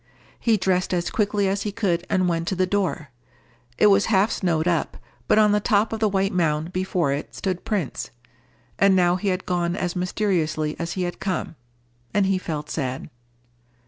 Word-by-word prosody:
He 225 -2 +2
dressed 185 -1 +1
as 175 -1 -1
quickly 205 -2 +1
as 195 +1 0
he 210 - -2
could, 185 -5 -1
and 185 -1 +2
went 165 -1 -1
to 190 - 0
the 185 +1 +2
door. 180 -7 -2 0.7
It - - +4
was 200 -1 +5
half 205 0 +3
snowed 165 -3 0
up, 170 -2 0 0.3
but - - +4
on 210 -1 +5
the 210 - +3
top 210 +1 +1
of 220 - -3
the 215 -1 +2
white 195 0 0
mound 165 -1 0
before 180 -5 0
it 145 - -5
stood 185 -2 -3
Prince. 195 - -2 0.7
And 195 -1 +5
now 175 -1 +4
he 200 - -4
had 185 -1 -1
gone 175 -1 0
as 180 -2 -2
mysteriously 175 -5 -1
as 170 0 -3
he 185 - -2
had 175 0 -4
come, 190 -3 -3 0.6
and 205 -1 +4
he 190 -1 +1
felt 150 -4 -4
sad. 130 -4 -4
185 Hz, 190 wpm, -23 LUFS, 170-200 Hz, 0.7 s, was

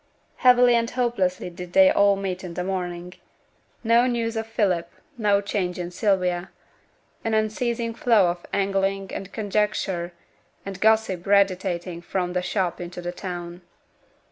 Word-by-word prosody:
Heavily 250 -1 +6
and 230 -1 +2
hopelessly 195 -8 -1
did 175 0 -9
they 285 0 +7
all 200 -4 +4
meet 190 -1 -4
in 175 -2 -7
the 180 - -2
morning. 180 -1 -4 0.7
No 235 +2 +4
news 230 -2 -1
of 225 0 -3
Philip, 185 -7 0 0.3
no 205 -4 +2
change 190 -3 -2
in 175 -1 -5
Sylvia; 180 -2 0 0.7
an 225 -1 0
unceasing 230 +2 -1
flow 225 -6 +3
of 175 0 -9
angling 195 0 -1
and 195 0 -6
conjecture 205 -4 -1 0.5
and 195 -1 -7
gossip 220 -5 +2
radiating 185 -3 +1
from 180 0 -2
the 180 - 0
shop 180 -1 -2
into 175 +1 -7
the 175 0 -4
town. 175 -1 -7
195 Hz, 145 wpm, -24 LUFS, 180-220 Hz, 0.7 s, they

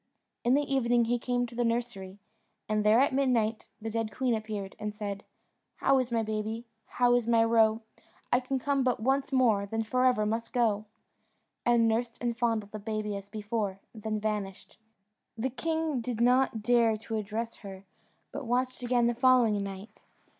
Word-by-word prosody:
In 245 +2 +4
the 290 - +2
evening 245 -4 +2
he 240 +1 0
came 245 0 0
to 240 - -11
the 240 +1 0
nursery, 230 -5 -2 0.5
and 215 0 0
there 215 +2 +5
at 275 0 +3
midnight 235 -5 +1
the 225 0 -5
dead 225 -1 -2
queen 255 0 0
appeared, 215 -3 -4
and 210 0 -3
said 205 -1 -5 0.5
"How 270 0 +3
is 250 -2 -2
my 230 -1 +1
baby? 220 +2 -3 0.2
How 245 -1 +2
is 245 -2 +2
my 230 -1 +4
roe? 225 -1 +3 0.5
I 245 - +5
can 260 +1 -2
come 275 +1 0
but 250 -1 +1
once 270 +5 0
more, 225 -7 +3
then 225 +2 -2
for 255 +3 +1
ever 215 -4 +2
must 225 +2 -2
go;" 215 -4 +1 0.8
and 235 -1 +4
nursed 230 +1 -1
and 240 -1 -1
fondled 225 -4 -1
the 215 - -6
baby 215 -1 -3
as 200 0 -8
before, 210 -2 -3
then 215 -1 -3
vanished. 210 -3 -4 0.6
The 250 +4 -1
king 320 0 -1
did 230 -1 -4
not 250 -2 +3
dare 235 -2 +3
to 225 +1 -4
address 220 +2 -4
her, 195 -2 -10 0.5
but 275 -3 -6
watched 255 +2 0
again 245 -1 +2
the 240 - +2
following 240 -4 +4
night. 195 +2 -8
230 Hz, 180 wpm, -29 LUFS, 215-245 Hz, 0.8 s, there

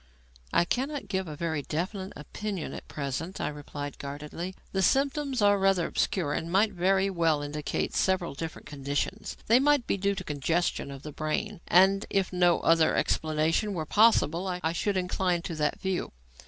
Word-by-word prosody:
"I 175 - +3
cannot 275 +8 -2
give 190 -1 -1
a 155 - -6
very 160 -1 -2
definite 185 +6 -4
opinion 195 +4 -5
at - - -8
present," 145 +5 -4
I - - -1
replied 145 -1 -7
guardedly. 150 +6 -6 0.2
"The 190 - 0
symptoms 275 +2 +1
are 205 0 +5
rather 195 -3 +3
obscure 165 -7 0
and 165 +2 -3
might 205 +4 +3
very 190 +2 +2
well 165 -4 +1
indicate 145 0 -3
several 190 -4 +1
different 160 +3 -6
conditions. 145 +8 -3
They 235 +3 +5
might 285 -2 +3
be - - 0
due 200 +1 0
to - - -5
congestion 150 +2 -1
of 140 0 -9
the 150 - -6
brain, 155 +7 -3
and, 195 +3 +5
if 195 -1 0
no 175 -1 +3
other 165 -1 +4
explanation 160 +6 +1
were 160 -2 -2
possible, 195 -3 +3 0.2
I 160 - +1
should 195 +3 -1
incline 180 -1 0
to 175 - -4
that 150 -1 0
view. 190 -2 -2
175 Hz, 170 wpm, -28 LUFS, 155-195 Hz, 0.2 s, are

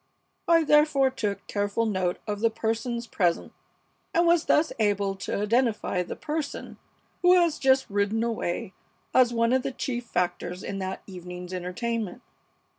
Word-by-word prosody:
I 330 -1 +5
therefore 295 -3 +4
took 210 -6 -3
careful 205 +2 -1
note 185 -4 0
of 205 -1 -3
the 230 +1 +3
persons 230 +2 -2
present, 175 -7 0 0.6
and 340 +1 +4
was 340 -1 +4
thus 310 +1 +3
able 200 -2 +1
to 190 - -3
identify 220 -3 +1
the 180 - -5
person 305 -1 -5 0.4
who 360 +1 +6
has 340 -3 +1
just 265 -1 +3
ridden 205 +2 0
away 205 -5 -2 0.4
as 250 -2 +5
one 230 +1 +2
of 260 - +3
the 270 - -3
chief 245 -2 -4
factors 180 0 -2
in 195 - -4
that 190 0 -4
evening's 180 -1 -8
entertainment. 205 +4 -3
225 Hz, 150 wpm, -26 LUFS, 195-260 Hz, 0.6 s, who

